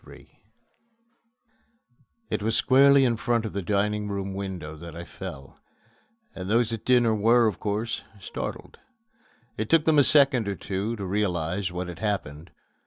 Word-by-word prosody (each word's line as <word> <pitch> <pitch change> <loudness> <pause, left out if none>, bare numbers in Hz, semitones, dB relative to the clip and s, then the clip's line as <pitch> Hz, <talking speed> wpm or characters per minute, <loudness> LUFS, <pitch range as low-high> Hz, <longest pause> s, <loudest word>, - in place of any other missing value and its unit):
III - - -16 1.9
It - - -1
was 110 +2 0
squarely 135 +1 +5
in 120 -2 +1
front 115 0 0
of 110 - -5
the 100 - -2
dining 105 +2 0
room 100 -1 -4
window 95 -5 -6
that 85 +1 -10
I 85 - -6
fell, 70 -4 -9 0.7
and 95 0 -7
those 115 +1 +2
at 110 - -6
dinner 120 -3 +4
were, 115 +3 +4
of 110 - -1
course, 105 +2 -3 0.2
startled. 95 - -7 0.8
It 110 0 -3
took 165 -2 +4
them 155 -2 +4
a - - +7
second 135 -6 +4
or 100 - -2
two 100 +5 -3
to 100 -3 -6
realize 90 -2 -1
what 90 +1 -4
had 85 -2 -8
happened. 90 -7 -3
105 Hz, 160 wpm, -26 LUFS, 95-115 Hz, 1.9 s, a